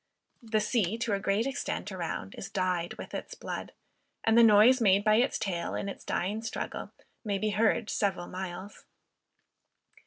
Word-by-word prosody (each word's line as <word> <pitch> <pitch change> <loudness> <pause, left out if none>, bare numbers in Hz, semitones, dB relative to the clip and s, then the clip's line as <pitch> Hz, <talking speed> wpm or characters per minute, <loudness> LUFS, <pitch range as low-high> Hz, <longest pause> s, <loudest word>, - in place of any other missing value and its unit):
The 220 -2 0
sea 215 -2 0
to 230 -2 -1
a 200 - +1
great 200 +3 +1
extent 270 -5 -3
around 170 - -4
is - - -7
dyed 180 -2 -1
with - - -9
its - - -5
blood, - - -6 0.5
and 225 - +3
the 235 - +8
noise 230 +3 +7
made 200 -2 +4
by 215 0 +4
its 250 +3 +2
tail 175 -4 -2
in - - -3
its 200 - -7
dying 205 +5 -2
struggle, 225 - -5 0.3
may 205 -3 -1
be 215 +2 0
heard 220 +1 +2
several 195 -5 -1
miles. 185 +2 -7
205 Hz, 165 wpm, -29 LUFS, 190-225 Hz, 0.5 s, the